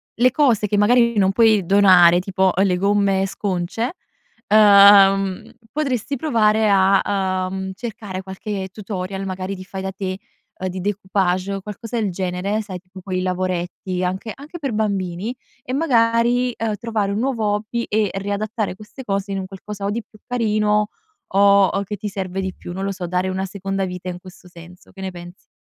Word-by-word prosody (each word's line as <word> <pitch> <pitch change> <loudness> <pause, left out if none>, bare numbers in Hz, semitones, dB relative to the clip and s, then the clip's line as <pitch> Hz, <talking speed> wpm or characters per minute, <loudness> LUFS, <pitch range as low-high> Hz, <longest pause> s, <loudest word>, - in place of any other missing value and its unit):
le 250 +2 +4
cose 245 -8 +2
che 205 - -1
magari 235 +2 +4
non 190 -1 +4
puoi 215 -2 +4
donare, 180 -3 +6
tipo 190 0 +1
le 190 -2 +3
gomme 195 0 +2
sconce, 195 - -3 0.6
uhm, 200 -1 +6 0.2
potresti 275 -2 -2
provare 220 -6 +2
a, 190 -1 +2
uhm, 190 0 -4
cercare 205 -3 -6
qualche 190 +1 -5
tutorial, 195 -1 -5
magari 190 +1 -4
di 185 - -9
fai 190 0 -7
da 190 0 -4
te, 190 -1 -4 0.4
uhm, 185 - -2
di 185 0 -5
découpage, 190 -1 -1
uhm, 195 - -4
qualcosa 225 +3 -5
del 200 -3 -1
genere, 185 +4 -2
sai 190 -4 -7
tipo 185 +1 -14
quei 185 -1 -3
lavoretti, 185 0 -2
anche 190 +4 -3
anche 300 +5 -10
per 275 -7 -3
bambini, 200 0 -2 0.3
e - - -7
magari, 245 -3 +2
uhm, 225 -2 -1
trovare 210 -2 -2
un 205 - -1
nuovo 240 -3 -1
hobby 220 +3 -2
e 210 -1 +1
riadattare 205 +1 -2
queste 215 +6 -12
cose 200 0 -2
in 195 - -2
un 190 - -4
qualcosa 200 +1 -8
o - - 0
di 225 +2 -3
più 215 0 -21
carino, 210 -3 +1 0.4
o 200 0 +6
o 200 - -1
che 210 +2 -5
ti 210 +1 -5
serve 195 -1 -4
di 190 -1 -3
più. 175 - -9
Non 190 - -4
lo 195 - -1
so, 185 -2 -5
dare 180 +2 -1
una 190 +1 -2
seconda 195 0 -3
vita 180 0 -6
in 180 0 -6
questo 185 0 -15
senso, 175 +1 -15
che 190 - -16
ne 190 -1 -4
pensi? 175 +1 -12
195 Hz, 180 wpm, -21 LUFS, 185-215 Hz, 0.6 s, donare